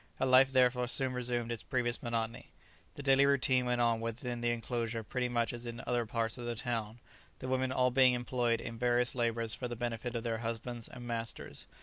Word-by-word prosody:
Her - - +1
life 130 +1 +6
therefore 125 -1 +3
soon 130 +1 +1
resumed 120 -1 -1
its 115 - -4
previous 120 -2 -1
monotony. 115 -1 -3 0.5
The 145 - -7
daily 135 0 +5
routine 130 -2 +3
went 120 0 +1
on 115 -1 +2
within 120 +1 -4
the 120 - +1
enclosure 115 -1 -2
pretty 125 +2 -2
much 120 -1 0
as 120 0 -6
in 120 0 -6
other 120 -2 0
parts 115 +2 -2
of 120 - -5
the 120 - -2
town, 115 -1 -3 0.4
the - - -6
women 130 0 0
all 125 -1 +2
being 130 0 +5
employed 120 -1 0
in 115 0 -6
various 120 0 +2
labours 115 -2 0
for 125 - -3
the 120 - -5
benefit 120 0 -3
of 115 - -2
their 115 -2 -1
husbands 115 0 -4
and 120 -1 -10
masters. 115 -1 -4
120 Hz, 210 wpm, -33 LUFS, 115-125 Hz, 0.5 s, life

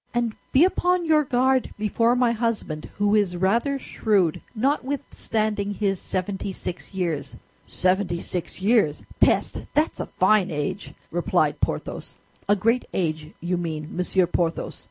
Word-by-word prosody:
"And 235 -2 +1 0.2
be 285 +6 +6
upon 360 -1 +1
your 310 -1 +4
guard 260 0 +1
before 230 +3 +2
my 245 -1 +3
husband, 220 -10 -2
who 205 0 +2
is 200 -4 +2
rather 230 +10 +2
shrewd, 200 - +1
notwithstanding 220 -5 -1
his 195 -3 0
seventy 190 +1 -3
six 180 - -6
years." 160 -9 -2 0.3
"Seventy 185 -1 +1
six 180 +1 -4
years! 205 -9 +3 0.2
Peste! - - +2
That's 305 +2 +1
a - - -3
fine 195 0 +4
age!" 160 +5 -4 0.2
replied - - +1
Porthos. - - -3 0.3
"A 205 - +6
great 230 +5 +1
age, 155 -3 -2
you 175 +1 -1
mean, 160 -3 -4
Monsieur 180 +1 +2
Porthos. 170 -1 -2
205 Hz, 135 wpm, -24 LUFS, 175-240 Hz, 0.3 s, be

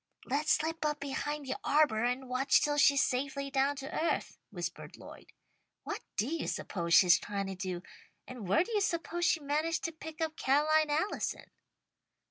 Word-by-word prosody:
"Let's 290 +4 +1
slip 320 +1 -1
up 300 -1 0
behind 285 +1 -3
the 265 - -3
arbour 280 -7 +3
and 250 +2 -1
watch 255 +2 +3
till 290 0 0
she's 280 -1 +5
safely 275 +2 -2
down 275 +1 +2
to 275 +3 -4
earth," - - -4
whispered - - -6
Lloyd. - - -13 0.5
"What - - -5 0.2
do 210 - +2
you 325 +3 -3
suppose 170 -3 -1
she's 180 -1 +7
trying 200 -1 -3
to 195 - -4
do, 185 -2 -4 0.4
and 245 -6 -8
where 200 - +4
do 465 - -9
you 420 -2 +1
suppose 345 -1 -1
she 325 -1 +2
managed 305 +3 -1
to 330 - -1
pick 320 0 -10
up 320 -1 -2
Ca'line 305 +3 +3
Allison?" 315 +8 -2
285 Hz, 175 wpm, -31 LUFS, 255-315 Hz, 0.5 s, she's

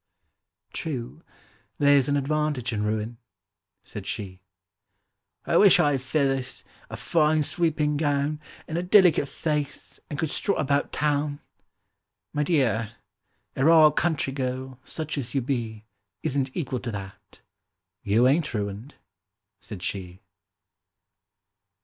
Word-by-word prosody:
— - - -60 0.3
"True. 135 -9 -5 0.6
There's 145 -2 +4
an 145 - +2
advantage 145 -4 -1
in 105 - -1
ruin," 110 +2 -2 0.6
said - - -8
she. 95 -2 -5 1.0
—"I - - +2
wish 200 -3 +7
I 145 - +4
had 135 -2 -1
feathers, 135 -1 -1 0.3
a - - -6
fine 155 -1 +2
sweeping 150 -2 0
gown, 145 0 0 0.3
And 160 +2 -2
a - - 0
delicate 180 -5 +5
face, 150 -1 -3
and 145 - -4
could 155 0 -2
strut 200 - 0
about 140 0 +1
Town!"— 145 -1 0 0.9
"My 150 - 0
dear—a 120 - -2
raw 160 0 +7
country 155 -3 0
girl, 130 -1 -4
such 155 -1 -4
as 120 -1 -6
you 135 - +2
be, 115 -4 -3 0.4
Isn't 135 0 0
equal 130 -6 -2
to 120 - -5
that. 100 -1 -9 0.6
You 110 +5 +3
ain't 150 -1 +1
ruined," 105 +6 -4 0.6
said 100 -6 -8
she. 90 -2 -5
140 Hz, 125 wpm, -26 LUFS, 120-150 Hz, 1.0 s, wish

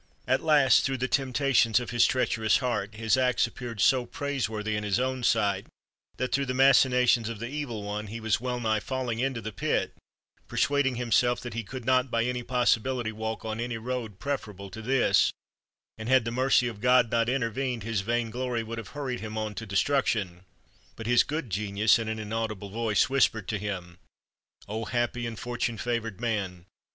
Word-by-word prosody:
At 130 +1 +2
last, 150 -4 +5
through 135 -1 -1
tlic 130 +1 -2
temptations 130 -3 +3
of 120 - -6
his 120 0 +4
treacher 120 -3 0
ous 110 +1 +4
heart, 105 -5 -2
his 110 +3 +1
acts 125 -1 +3
appeared 120 -3 -7
so 125 +2 +3
praiseworthy 110 -7 -2
in 105 - -2
his 105 +2 +1
own 130 0 -1
sight 100 -4 +1 0.5
that, 130 +1 -2
through 140 +1 0
the 130 - -2
machinations 125 -3 +4
of 115 - -5
the 115 - -5
E\^il 130 -6 -4
One, 105 +1 -4
he 115 +3 -6
was 110 -1 0
well 125 -1 -2
nigh 110 -2 +1
falling 125 -1 -3
into 130 -2 -1
the 110 +1 -5
pit, - - -1 0.5
persuading 140 -2 +1
himself 120 0 +2
that 120 - -6
he 115 - -2
could 125 +3 -8
not 130 0 +3
by 115 -1 +1
any 125 0 -2
possibility 120 -1 +1
walk 110 -1 -5
on 110 0 -3
any 120 -1 -3
road 115 -3 -4
preferable 105 -7 -5
to 110 - -8
this; 130 +2 +3 0.7
and 110 +2 -5
had 130 -3 +4
the 115 - -2
mercy 130 0 +3
of 110 -3 -6
God 125 -2 +4
not 115 0 +2
inter 125 -3 0
vened, 125 -2 -3
his 110 -2 -1
vainglory 120 +2 -1
would 115 +1 -6
have 115 +5 -10
hurried 130 -4 -3
him 110 0 -6
on 110 -1 -2
to 110 +3 -7
destruction. 100 -4 0 0.5
But 115 - -8
his 120 +1 +5
good 145 -6 -3
genius 105 +3 +2
in 115 - -3
an 110 0 -2
inaudible 110 -2 -4
voice 110 -1 +1
whispered 125 -6 +1
to 110 - -1
him: 90 -4 -5 0.7
"O 110 +2 -4
happy 120 0 -1
and 115 -1 -6
fortune 120 -1 -3
favored 115 -4 -3
man! 100 -7 -2
115 Hz, 190 wpm, -27 LUFS, 110-125 Hz, 0.7 s, last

